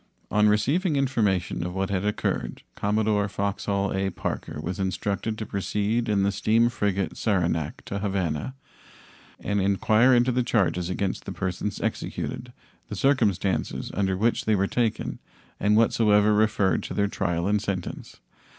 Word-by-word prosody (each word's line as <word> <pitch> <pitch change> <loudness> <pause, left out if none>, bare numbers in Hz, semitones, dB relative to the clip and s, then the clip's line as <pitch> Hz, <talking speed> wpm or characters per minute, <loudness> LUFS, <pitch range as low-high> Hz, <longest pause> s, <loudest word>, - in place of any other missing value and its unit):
On 105 0 +4
receiving 145 - +2
information 110 -11 0
of 90 +1 -4
what 95 0 -1
had 95 -1 0
occurred 105 -11 -2
Commodore 105 0 +1
Foxhall 100 0 -1
A. 95 0 0
Parker 85 - -4
was 90 +5 -4
instructed 100 +3 -2
to 110 - -4
proceed 105 +4 -1
in 100 -2 +2
the 100 - +2
steam 115 +4 +2
frigate 100 -5 -1
Saranac 85 -7 -1
to 100 - -4
Havana 95 - -2 0.8
and 100 -1 -1
inquire 110 +5 +3
into 120 +1 +3
the 125 +1 +1
charges 95 -7 +1
against 95 +1 -2
the - - -5
persons 95 +2 -3
executed, - - -4 0.4
the - - -5
circumstances 110 -9 +1
under 95 -1 0
which 115 +4 +1
they 110 - +3
were 100 0 +2
taken, 115 +1 -1 0.4
and 105 +1 +3
whatsoever 105 -2 +4
referred 105 -4 +2
to - - -6
their 100 - +2
trial 85 -4 -1
and 105 0 +2
sentence. 95 -4 -5
100 Hz, 150 wpm, -25 LUFS, 95-110 Hz, 0.8 s, On